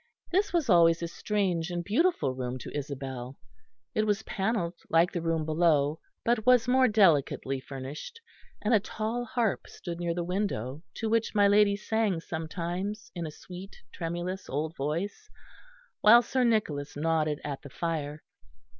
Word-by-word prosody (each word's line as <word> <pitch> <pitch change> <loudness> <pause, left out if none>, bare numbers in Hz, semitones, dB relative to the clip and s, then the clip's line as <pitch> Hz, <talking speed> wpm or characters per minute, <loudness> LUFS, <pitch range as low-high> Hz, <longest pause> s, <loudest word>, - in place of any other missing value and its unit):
This 395 +3 +2
was 335 -6 +1
always 170 -3 +5
a - - -1
strange 180 -2 -1
and 175 -1 -3
beautiful 215 - +2
room 130 -1 -4
to 125 - -8
Isabel. 135 -2 -5 0.6
It 215 0 +1
was 210 +1 +1
panelled 195 -4 -1 0.2
like 165 +2 +4
the 175 - -3
room 165 -1 0
below, 155 -2 +2 0.3
but 235 -2 +2
was 250 -1 +5
more 255 +1 +5
delicately 160 - +3
furnished, 135 - -8 0.4
and 215 +3 +2
a 220 - +6
tall 220 +4 -3
harp 230 -2 -1
stood 170 -1 -7
near 170 -1 -1
the 175 - -1
window 170 - -2
to 225 - -2
which 225 0 +1
my 205 -1 +6
lady 205 0 +5
sang 210 -3 0
sometimes 175 +7 -4
in 170 -3 -4
a - - -6
sweet 180 +5 -10 0.2
tremulous 175 +3 -4
old 155 +4 -2
voice, 170 - -3 0.7
while 235 +3 +8
Sir 255 +2 0
Nicholas 185 -12 0
nodded 155 -1 +1
at 140 -2 -4
the 140 - -10
fire. 155 -1 -3
175 Hz, 155 wpm, -29 LUFS, 155-215 Hz, 0.7 s, while